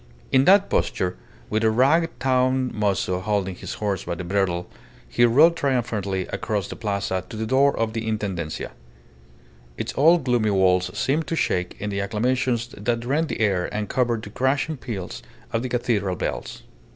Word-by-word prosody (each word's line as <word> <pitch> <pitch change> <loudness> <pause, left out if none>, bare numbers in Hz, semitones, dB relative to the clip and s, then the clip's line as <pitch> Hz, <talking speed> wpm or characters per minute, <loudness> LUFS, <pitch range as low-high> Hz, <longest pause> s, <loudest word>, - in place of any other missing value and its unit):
In 135 0 +4
that 200 +1 +6
posture, 90 -1 0 0.4
with 110 +1 +1
a 110 - +5
ragged 140 +9 +2
town 130 0 +2
mozo 100 -3 0
holding 100 -1 -1
his 90 - -7
horse 100 -3 -2
by 85 - -3
the 90 - -6
bridle, 90 -1 0 0.4
he 120 - +1
rode 150 +9 +5
triumphantly 115 - -1
across 110 -5 -2
the - - -7
Plaza 100 -4 -2
to 110 - -7
the 110 - -2
door 135 +4 +3
of 115 -1 -1
the 115 0 -3
Intendencia. 95 -8 -3 1.1
Its - - -4
old 165 +3 +5
gloomy 120 -4 +2
walls 90 -2 +3
seemed 150 +4 0
to 165 - -1
shake 90 - -1
in 105 0 -3
the 100 0 -1
acclamations 120 +3 0
that 115 +1 -2
rent 150 +6 +1
the - - -4
air 95 -4 +1
and 105 -1 -3
covered 120 -3 0
the 105 - -8
crashing 135 +6 0
peals 105 -9 -6 0.3
of 115 - +1
the 130 - -3
cathedral 110 -6 0
bells. - - -4
110 Hz, 175 wpm, -23 LUFS, 100-130 Hz, 1.1 s, that